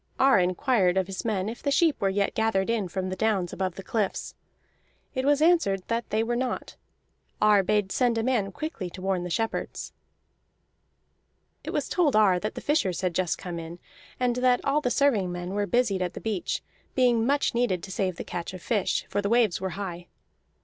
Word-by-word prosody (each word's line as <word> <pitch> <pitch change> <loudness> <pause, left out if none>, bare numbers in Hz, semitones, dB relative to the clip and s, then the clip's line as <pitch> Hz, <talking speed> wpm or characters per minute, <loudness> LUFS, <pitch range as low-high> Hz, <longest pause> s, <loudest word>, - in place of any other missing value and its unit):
Ar 270 -6 +6
inquired 185 +1 +2
of 190 - +2
his 190 0 -6
men 205 -4 -1
if 225 +2 -6
the 285 - 0
sheep 310 +1 +2
were 195 - +2
yet 200 +1 0
gathered 220 -2 +1
in 220 -5 0
from 185 +1 -3
the 185 - -3
downs 195 -3 0
above 185 -2 -2
the 195 - -8
cliffs. 210 -1 -2 0.8
It 260 -1 -2
was 290 +1 +3
answered 315 - +3
that 230 0 -1
they 220 +1 +1
were 240 +1 -1
not. 255 +1 -3 0.6
Ar 210 -1 +5
bade 200 0 0
send 245 -3 +2
a 225 - 0
man 225 -6 +1
quickly 225 - -5
to 185 - -10
warn 190 -2 0
the 180 - -4
shepherds. 225 +6 -3 1.7
It - - -6
was - - -1
told 320 -9 +2
Ar 200 -4 +5
that 215 +3 -4
the - - -5
fishers 245 - 0
had 180 -2 0
just 180 -1 0
come 175 -2 -6
in, 165 +1 -8 0.4
and 250 -1 +1
that 250 0 +2
all 285 +2 +2
the 250 - 0
serving 240 -10 +2
men 175 +1 -5
were 205 0 0
busied 230 -6 +1
at 180 -1 -2
the - - -5
beach, 215 -5 -2 0.3
being 245 -3 +3
much 280 +4 +1
needed 235 -8 0
to 190 - -7
save 185 -1 -1
the - - -6
catch 175 +1 -5
of 185 - -9
fish, 210 -5 0
for 205 - -1
the 200 - -1
waves 230 -6 +3
were 190 - -1
high. 175 -3 -5
205 Hz, 205 wpm, -27 LUFS, 185-245 Hz, 1.7 s, Ar